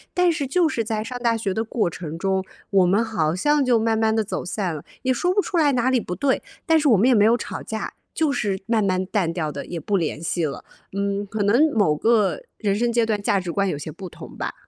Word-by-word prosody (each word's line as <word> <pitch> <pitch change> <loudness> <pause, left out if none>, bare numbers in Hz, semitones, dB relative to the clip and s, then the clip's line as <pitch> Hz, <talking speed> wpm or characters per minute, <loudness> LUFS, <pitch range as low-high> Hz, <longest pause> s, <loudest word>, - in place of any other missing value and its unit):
但 360 -1 +4
是 295 -4 -2
就 345 +5 +3
是 235 -7 -1
在 215 -1 -2
上 250 +2 -5
大 235 -2 +1
学 205 -4 -2
的 220 - -1
过 225 -4 0
程 165 -1 -7
中， 190 +1 0 0.3
我 195 -2 +5
们 205 +6 +3
好 165 -8 0
像 295 +10 +2
就 250 -3 +3
慢 225 0 +1
慢 220 0 +2
地 220 - +2
走 205 - -4
散 180 -2 -2
了， 150 - -8 0.2
也 260 0 +2
说 355 +8 0
不 390 - +1
出 375 - -3
来 295 -4 +4
哪 255 +1 +2
里 255 - +3
不 180 -5 -5
对， 265 +8 +1 0.2
但 325 -1 +4
是 300 - +1
我 225 - +6
们 215 +7 +4
也 260 - +5
没 210 -3 +5
有 230 +2 +5
吵 - - -6
架， 220 0 -5 0.2
就 315 -3 +1
是 205 -8 -1
慢 225 -2 +1
慢 185 -1 0
淡 185 -3 0
掉 160 -3 -2
的 140 -1 -6
也 170 - -5
不 200 +6 0
联 160 -3 -2
系 170 0 -1
了。 145 - -5 0.3
嗯， 200 +1 -1
可 210 +1 -2
能 245 +10 +4
某 200 -9 +3
个 220 - +2 0.2
人 200 -3 0
生 235 +3 +1
阶 235 -1 +2
段 215 -2 -1
价 200 0 +2
值 180 -2 -4
观 200 +3 0
有 150 - -2
些 150 +2 -6
不 185 +3 -9
同 - - -12
吧。 - - -3
215 Hz, 285 characters per minute, -23 LUFS, 185-240 Hz, 0.3 s, 我